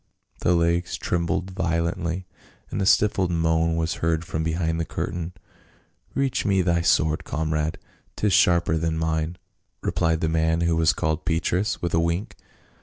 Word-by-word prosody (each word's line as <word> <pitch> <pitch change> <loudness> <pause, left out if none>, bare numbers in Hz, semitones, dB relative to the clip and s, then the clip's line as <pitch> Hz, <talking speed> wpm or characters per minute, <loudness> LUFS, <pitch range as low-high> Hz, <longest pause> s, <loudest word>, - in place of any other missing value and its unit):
The 90 - +2
legs 85 +1 +1
trembled 90 +2 -1
violently, 85 0 -1 0.5
and - - -2
a 95 - +1
stifled 100 -3 +3
moan 80 -1 +1
was 80 +1 -2
heard 80 0 0
from 80 - -3
behind 80 0 -1
the - - +1
curtain. 85 +1 -4 0.4
" - - -36
Reach 135 -2 0
me 95 -2 +2
thy 85 -1 +2
sword, 80 -1 +2
comrade, 80 0 -1 0.4
'tis 105 -2 +1
sharper 85 -2 +4
than 80 0 -1
mine," 80 +1 -1 0.5
replied 80 -1 +1
the 80 - +1
man 80 +1 +1
who 85 -1 +2
was 80 0 +4
called 80 -3 -1
Petrus, 90 +4 0
with 85 - -1
a 80 - +4
wink. 85 +5 -1
85 Hz, 160 wpm, -24 LUFS, 80-90 Hz, 0.5 s, sharper